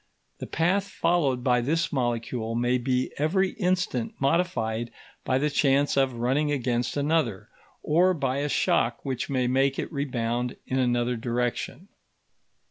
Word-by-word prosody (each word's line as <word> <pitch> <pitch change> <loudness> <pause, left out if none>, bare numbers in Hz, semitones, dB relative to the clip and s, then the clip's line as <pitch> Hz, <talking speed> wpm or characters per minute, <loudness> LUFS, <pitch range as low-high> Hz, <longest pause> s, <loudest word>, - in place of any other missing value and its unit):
The - - -6
path 185 +5 +1
followed 165 -8 +1
by 125 -1 +3
this 160 +7 0
molecule 120 -3 -2
may 120 +1 +1
be 125 +1 0
every 190 +6 +2
instant 180 - -1
modified 135 -7 0 0.3
by 130 - +1
the 150 +2 0
chance 140 0 +2
of 135 -2 +2
running 135 +6 +1
against 125 -2 -1
another, 145 -8 0 0.3
or 180 +4 +3
by 135 -3 -1
a 145 +1 -1
shock 120 -2 +1
which 130 0 -3
may 130 -2 +1
make 135 +2 +2
it - - -4
rebound 125 -3 -2
in 130 - -1
another 120 -1 +1
direction. 125 - -3
130 Hz, 140 wpm, -26 LUFS, 120-150 Hz, 0.3 s, by